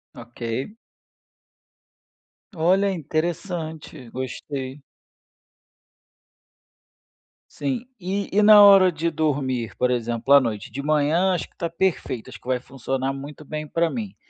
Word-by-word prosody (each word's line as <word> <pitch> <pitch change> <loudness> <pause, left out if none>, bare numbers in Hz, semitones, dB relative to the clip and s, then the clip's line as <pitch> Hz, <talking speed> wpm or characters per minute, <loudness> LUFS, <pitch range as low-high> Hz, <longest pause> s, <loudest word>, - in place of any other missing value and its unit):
Ok. 120 - -6 1.8
Olha, 190 +4 +2
interessante, 160 -4 -4
gostei. 130 +1 -5 2.7
Sim. 250 -3 -3
E 195 +2 -3
e 210 - +5
na 210 0 +9
hora 195 -2 +8
de 165 +1 -1
dormir, 135 -8 -1
por 125 0 +1
exemplo, 120 +2 0
à 140 - +8
noite? 110 -5 -4
De 140 - -5
manhã 155 +5 +2
acho 175 - -3
que - - -35
tá 170 - -2
perfeito, 165 -9 -2
acho 115 -4 -11
que - - -17
vai 130 -1 +1
funcionar 135 +1 -3
muito 145 +2 -9
bem 155 +1 -5
pra 165 +3 +1
mim 210 0 -5
150 Hz, 120 wpm, -23 LUFS, 130-180 Hz, 2.7 s, na